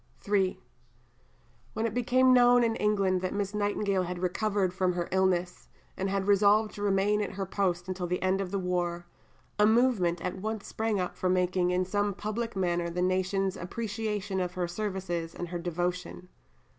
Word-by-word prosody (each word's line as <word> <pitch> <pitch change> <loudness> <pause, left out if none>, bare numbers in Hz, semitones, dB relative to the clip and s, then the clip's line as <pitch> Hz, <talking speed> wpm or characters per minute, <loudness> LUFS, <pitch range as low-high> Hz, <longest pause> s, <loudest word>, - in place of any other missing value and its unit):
III 195 -2 +1 1.1
When 220 +1 -1
it 225 - -1
became 255 +2 +4
known 245 0 +6
in 225 -1 +1
England 195 -3 +1
that 185 +1 -3
Miss 200 0 -2
Nightingale 205 -2 0
had 180 0 -4
recovered 190 +1 0
from 185 -1 +1
her 175 -1 -2
illness, 180 -1 0 0.3
and 195 +1 -2
had 195 0 -1
resolved 205 +1 +4
to 205 - -8
remain 205 +1 +2
at 200 - -3
her 195 0 -3
post 180 -2 -1
until 185 -1 -3
the 180 +1 -1
end 190 +1 +1
of 190 - -3
the 200 - -2
war, 175 -2 -2 0.5
a 210 - +6
movement 220 -7 +3
at 180 - -2
once 215 +1 -4
sprang 220 -2 -1
up 180 - -3
for 185 - -1
marking 180 0 +2
in 180 +1 +1
some 205 +1 -1
public 220 +2 -4
manner 175 -2 0
the 180 +1 -2
nation's 185 +1 0
appreciation 205 0 -3
of 180 -1 -2
her 180 -1 -2
services 175 -3 -3
and 175 - -5
her 175 0 -4
devotion. 180 +1 -3
190 Hz, 180 wpm, -29 LUFS, 180-210 Hz, 1.1 s, known